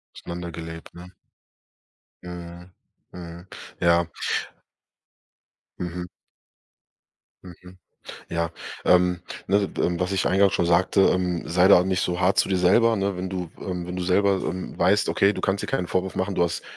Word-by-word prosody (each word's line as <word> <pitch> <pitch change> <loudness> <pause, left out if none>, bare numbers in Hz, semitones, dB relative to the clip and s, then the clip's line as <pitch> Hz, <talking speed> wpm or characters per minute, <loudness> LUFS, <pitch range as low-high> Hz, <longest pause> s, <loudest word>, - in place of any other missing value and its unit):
Auseinander 85 0 -7
gelebt, 80 0 -9
ne? 90 +1 -12 1.1
Mhm, 90 0 -9 0.4
mhm, 85 0 -10 0.3
ja. 85 0 +3 1.7
Mhm. 90 0 -5 1.4
Mhm, 90 0 -13 0.5
ja. 85 0 -1 0.3
Ähm, 90 -1 +3 0.3
ne, 100 +1 +1
ähm, 85 -1 0
was 90 +1 -1
ich 95 -1 0
eingangs 100 +1 +3
schon 85 - +1
sagte, 90 +3 +3
ähm, 90 -2 -2
sei 90 +2 +4
da 100 - +8
auch - - +2
nicht 95 -1 0
so 90 0 -1
hart 90 +2 +3
zu - - +2
dir 95 - +2
selber, 110 +6 +4
ne, 100 -1 -1
wenn 90 +1 -4
du, 90 -3 -5
ähm 90 -3 -4
wenn 90 +1 -6
du 90 - -3
selber, 100 +2 +3
ähm, 95 - -4
weißt: 100 +4 +3
„Okay, 100 +1 +3
du - - -5
kannst 95 +1 0
dir - - -5
keinen 90 - -1
Vorwurf 95 +1 -2
machen, 95 +2 -1
du 90 - 0
hast 85 0 -1
90 Hz, 160 wpm, -24 LUFS, 85-95 Hz, 1.7 s, da